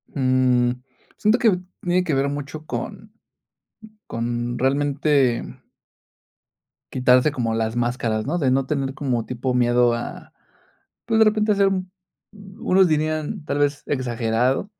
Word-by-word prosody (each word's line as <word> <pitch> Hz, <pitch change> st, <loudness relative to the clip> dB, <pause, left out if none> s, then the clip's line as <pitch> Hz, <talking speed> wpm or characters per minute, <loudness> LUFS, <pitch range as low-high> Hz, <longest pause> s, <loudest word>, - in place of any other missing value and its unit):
Mmm, 130 Hz, -2 st, +2 dB, 0.5 s
siento 215 Hz, +3 st, +3 dB
que 205 Hz, -6 st, +3 dB, 0.2 s
tiene 180 Hz, 0 st, +1 dB
que 160 Hz, -5 st, -2 dB
ver 140 Hz, +1 st, +1 dB
mucho 145 Hz, +2 st, -6 dB
con -, -, -6 dB, 0.9 s
con 120 Hz, +1 st, -3 dB
realmente. 140 Hz, -1 st, +1 dB, 1.5 s
Quitarse 125 Hz, +3 st, +4 dB
como 120 Hz, -5 st, -2 dB
las 110 Hz, 0 st, -1 dB
máscaras, 120 Hz, -2 st, -1 dB
¿no?, 170 Hz, +4 st, 0 dB
de 135 Hz, -6 st, +1 dB
no 135 Hz, 0 st, +2 dB
tener 135 Hz, -1 st, -2 dB
como 125 Hz, -5 st, -2 dB
tipo 125 Hz, +1 st, -3 dB
miedo 120 Hz, -1 st, +3 dB
a, 120 Hz, -, -6 dB, 0.7 s
pues, 225 Hz, -1 st, +1 dB
de 220 Hz, -, +7 dB
repente 215 Hz, 0 st, +2 dB
hacer 200 Hz, -1 st, +3 dB
un 185 Hz, -1 st, -3 dB, 0.7 s
unos 190 Hz, 0 st, +3 dB
dirían, 155 Hz, +3 st, -1 dB
tal 145 Hz, -, -2 dB
vez 145 Hz, -1 st, 0 dB
exagerado, 125 Hz, -, 0 dB
135 Hz, 130 wpm, -22 LUFS, 120-155 Hz, 1.5 s, de